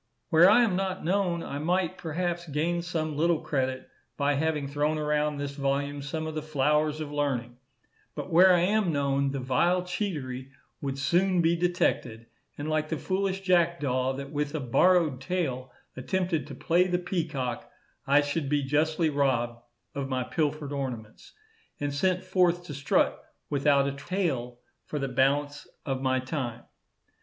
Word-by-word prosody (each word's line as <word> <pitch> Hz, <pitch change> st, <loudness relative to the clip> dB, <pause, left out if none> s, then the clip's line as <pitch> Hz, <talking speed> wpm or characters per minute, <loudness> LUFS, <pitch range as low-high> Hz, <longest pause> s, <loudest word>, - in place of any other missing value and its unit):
Where 170 Hz, +3 st, +7 dB
I 240 Hz, +4 st, +6 dB
am 210 Hz, -6 st, +1 dB
not 190 Hz, -1 st, -2 dB
known, 180 Hz, -2 st, +1 dB
I 140 Hz, -, -5 dB
might, 180 Hz, +3 st, 0 dB
perhaps, 170 Hz, +1 st, -3 dB
gain 165 Hz, +4 st, 0 dB
some 160 Hz, -3 st, -3 dB
little 165 Hz, +2 st, +2 dB
credit 130 Hz, -2 st, -2 dB, 0.3 s
by 145 Hz, 0 st, +2 dB
having 150 Hz, 0 st, 0 dB
thrown 150 Hz, +2 st, 0 dB
around 150 Hz, 0 st, 0 dB
this 145 Hz, 0 st, -3 dB
volume 140 Hz, 0 st, -1 dB
some 155 Hz, +3 st, -4 dB
of 160 Hz, -, -4 dB
the 155 Hz, -, -3 dB
flowers 150 Hz, +1 st, +1 dB
of 150 Hz, -1 st, -5 dB
learning; 130 Hz, -5 st, -2 dB, 0.6 s
but -, -, -6 dB
where 185 Hz, +3 st, +8 dB
I 175 Hz, -1 st, +4 dB
am 200 Hz, 0 st, +2 dB
known, 140 Hz, -1 st, +1 dB
the 135 Hz, 0 st, -3 dB
vile 170 Hz, +8 st, +2 dB
cheatery 150 Hz, -9 st, -4 dB, 0.3 s
would 135 Hz, -1 st, -3 dB
soon 180 Hz, +6 st, +2 dB
be 170 Hz, 0 st, +3 dB
detected, 170 Hz, -, 0 dB, 0.3 s
and 145 Hz, -, -4 dB
like 155 Hz, 0 st, 0 dB
the 160 Hz, -, -1 dB
foolish 190 Hz, +2 st, -1 dB
jackdaw, 165 Hz, -8 st, +1 dB
that 140 Hz, +1 st, -7 dB
with 150 Hz, 0 st, -2 dB
a -, -, -1 dB
borrowed 150 Hz, +2 st, +3 dB
tail 130 Hz, -5 st, -2 dB, 0.2 s
attempted 175 Hz, +3 st, -1 dB
to 140 Hz, -, -8 dB
play 175 Hz, +6 st, +2 dB
the 180 Hz, -1 st, +1 dB
peacock, 155 Hz, -9 st, -3 dB, 0.4 s
I 140 Hz, +2 st, +5 dB
should 145 Hz, 0 st, -2 dB
be 145 Hz, -1 st, +1 dB
justly 155 Hz, +3 st, +1 dB
robbed 120 Hz, -5 st, 0 dB, 0.3 s
of 140 Hz, -1 st, -4 dB
my 130 Hz, -1 st, 0 dB
pilfered 150 Hz, 0 st, -2 dB
ornaments, 125 Hz, -6 st, -6 dB, 0.5 s
and 145 Hz, -1 st, -2 dB
sent 185 Hz, +5 st, +1 dB
forth 180 Hz, -1 st, +2 dB
to 160 Hz, -, -8 dB
strut 140 Hz, 0 st, +1 dB, 0.3 s
without 140 Hz, -1 st, +3 dB
a -, -, 0 dB
tail 140 Hz, -6 st, -3 dB, 0.2 s
for 150 Hz, -, -5 dB
the 135 Hz, -2 st, -2 dB
balance 145 Hz, +3 st, +1 dB, 0.2 s
of 135 Hz, -1 st, -2 dB
my 130 Hz, -1 st, +1 dB
time. 130 Hz, -3 st, -4 dB
150 Hz, 165 wpm, -28 LUFS, 135-175 Hz, 0.6 s, where